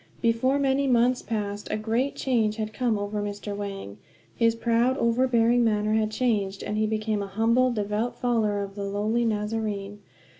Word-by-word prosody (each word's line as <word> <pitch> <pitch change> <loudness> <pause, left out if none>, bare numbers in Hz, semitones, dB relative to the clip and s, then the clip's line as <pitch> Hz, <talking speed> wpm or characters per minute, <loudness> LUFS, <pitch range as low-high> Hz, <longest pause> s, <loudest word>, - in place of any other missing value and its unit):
Before 235 +4 +2
many 275 0 +1
months 245 0 +3
passed 205 -2 -4
a - - -1
great 230 +6 -1
change 225 -5 +1
had 215 -1 -4
come 230 0 0
over 205 +1 -3
Mr. 205 0 -5
Wang; 195 - -6 0.4
his 230 -1 +2
proud, 235 +3 +1
overbearing 235 0 +3
manner 215 -1 +1
had 220 -1 +2
changed, 210 -4 -1
and 210 - -3
he 215 0 +1
became 215 -1 -1
a 200 - -4
humble, 230 +6 +2
devout 215 +1 -2
follower 215 -4 0
of 195 0 -7
the 200 0 -5
lowly 210 +4 0
Nazarene. 210 -2 -2
220 Hz, 165 wpm, -26 LUFS, 205-235 Hz, 0.4 s, months